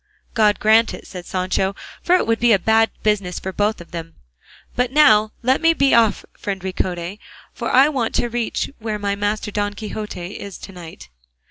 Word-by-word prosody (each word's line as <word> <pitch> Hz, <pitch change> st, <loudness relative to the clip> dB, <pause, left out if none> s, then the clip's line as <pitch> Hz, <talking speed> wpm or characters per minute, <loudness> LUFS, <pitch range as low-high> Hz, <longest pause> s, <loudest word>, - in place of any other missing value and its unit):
"God 210 Hz, -3 st, +3 dB
grant 220 Hz, +2 st, +4 dB
it," -, -, -13 dB
said 180 Hz, -2 st, -9 dB
Sancho, 185 Hz, +1 st, -1 dB, 0.3 s
"for 360 Hz, -, +3 dB
it -, -, +2 dB
would 225 Hz, 0 st, +1 dB
be 235 Hz, -1 st, +4 dB
a -, -, +5 dB
bad 220 Hz, +3 st, +3 dB
business 200 Hz, -4 st, 0 dB
for 190 Hz, -, -5 dB
both 210 Hz, +3 st, 0 dB
of 170 Hz, -, -13 dB
them; 165 Hz, -1 st, -7 dB, 0.6 s
but 250 Hz, 0 st, 0 dB
now 220 Hz, -8 st, +5 dB
let 260 Hz, +4 st, +2 dB
me 330 Hz, 0 st, +5 dB
be 275 Hz, -2 st, +3 dB
off, 230 Hz, -2 st, +3 dB
friend 195 Hz, -1 st, -3 dB
Ricote, 185 Hz, 0 st, -3 dB, 0.3 s
for -, -, -4 dB
I 270 Hz, +3 st, +6 dB
want 260 Hz, -7 st, -1 dB
to -, -, +1 dB
reach 235 Hz, -1 st, -2 dB
where 220 Hz, -1 st, -3 dB
my 200 Hz, -1 st, -1 dB
master 205 Hz, +1 st, -2 dB
Don 205 Hz, 0 st, -2 dB
Quixote 210 Hz, -4 st, -6 dB
is 200 Hz, -2 st, -8 dB
to -, -, -10 dB
night." 170 Hz, -, -11 dB
210 Hz, 195 wpm, -20 LUFS, 190-230 Hz, 0.6 s, I